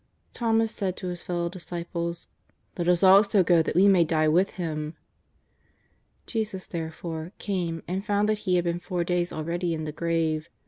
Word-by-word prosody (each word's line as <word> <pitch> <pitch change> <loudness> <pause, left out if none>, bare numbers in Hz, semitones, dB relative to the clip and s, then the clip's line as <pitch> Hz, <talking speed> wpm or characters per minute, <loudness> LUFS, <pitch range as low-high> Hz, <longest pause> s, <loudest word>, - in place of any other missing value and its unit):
Thomas 225 -1 +1
said 190 -4 -2
to 185 - -4
his 175 -1 -5
fellow 175 -1 -2
disciples: 170 -1 -5 0.2
" - - -44
Let 170 - 0
us 180 +1 +3
also 195 +1 +6
go 170 -1 +4
that 160 - -2
we 190 +3 +6
may 190 -4 +6
die 155 -1 +1
with 180 +5 +2
Him." 155 -3 -4 1.3
Jesus, 215 -5 -3
therefore, 160 +1 -5
came 175 -5 -3
and 185 +3 -2
found 205 0 +1
that 215 -1 +1
he 180 - +4
had 175 - +2
been 170 0 -1
four 180 -1 -2
days 175 0 0
already 170 +2 -2
in 155 - -4
the 155 - -4
grave. 160 -1 -1
175 Hz, 180 wpm, -26 LUFS, 165-190 Hz, 1.3 s, also